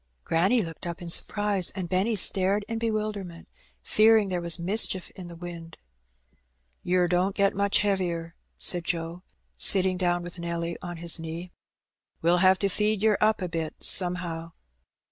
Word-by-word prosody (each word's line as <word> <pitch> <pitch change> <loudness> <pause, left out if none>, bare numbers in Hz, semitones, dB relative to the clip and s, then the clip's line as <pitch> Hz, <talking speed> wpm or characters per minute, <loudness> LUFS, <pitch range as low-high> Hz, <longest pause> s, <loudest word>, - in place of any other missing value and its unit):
Granny 195 +8 +2
looked 165 0 -7
up 170 -1 -5
in 175 -1 -7
surprise, 205 -1 0
and 185 -3 -4
Benny 190 +6 +1
stared 195 +1 +3
in 230 -1 -3
be 230 0 0
wilderment, 210 -5 -4 0.4
fearing 215 -1 +4
there 180 -1 -2
was 170 -1 -1
mischief 190 +1 0
in 180 -2 -10
the 170 - -10
wind. 170 -1 -9 1.0
"Yer 180 0 +2
don't 180 +3 +1
get 200 -1 +2
much 200 0 +2
heavier," 175 -5 -1 0.2
said 175 -2 0
Joe, 170 0 -3 0.4
sitting 190 -1 +4
down 175 -1 0
with 175 0 -8
Nelly 170 0 -3
on 175 -1 -6
his 170 0 -1
knee. 165 +2 -6 0.7
"We'll 170 +2 +4
have 185 +1 +5
to - - +4
feed 210 +1 0
yer 220 -1 +4
up 215 -2 +2
a - - -1
bit 165 -2 -4
somehow." 175 -2 0
180 Hz, 165 wpm, -26 LUFS, 170-200 Hz, 1.0 s, have